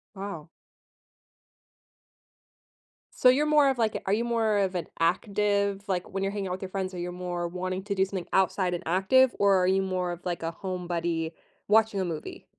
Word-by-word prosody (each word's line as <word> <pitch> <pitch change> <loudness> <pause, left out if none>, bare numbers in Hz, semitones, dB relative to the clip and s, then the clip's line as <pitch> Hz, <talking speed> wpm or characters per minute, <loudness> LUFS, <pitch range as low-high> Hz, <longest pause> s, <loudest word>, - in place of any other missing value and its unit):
Wow. 190 -5 -6 2.7
So, 250 - +6
you're 280 +4 +4
more 300 -2 +5
of, 265 - 0
like, 225 -2 +1
a - - -3
are 195 - +2
you 225 +3 +1
more 225 -3 +1
of 195 -2 +1
an 175 -3 -3
active 200 +3 +1
like, 180 -2 -2
when 195 0 -2
you're 195 - 0
hanging 200 -2 -3
out 180 - -3
with 185 - -6
your 190 - -5
friends, 190 -1 -3
are - - -6
you 175 0 -4
more 175 -1 -3
wanting 185 +1 -4
to 200 0 -2
do 190 - +3
something 190 -2 -5
outside 185 -1 +2
and 175 - -3
active, 215 +9 +4
or 200 -1 +5
are 180 0 +2
you 190 +1 +3
more 185 -2 -1
of 175 0 -8
like 175 -2 -2
a 165 - -1
home 180 0 -5
buddy, 165 -1 -2 0.3
watching 215 -1 +3
a 185 - -1
movie? 160 -3 -6
190 Hz, 205 wpm, -27 LUFS, 180-205 Hz, 2.7 s, So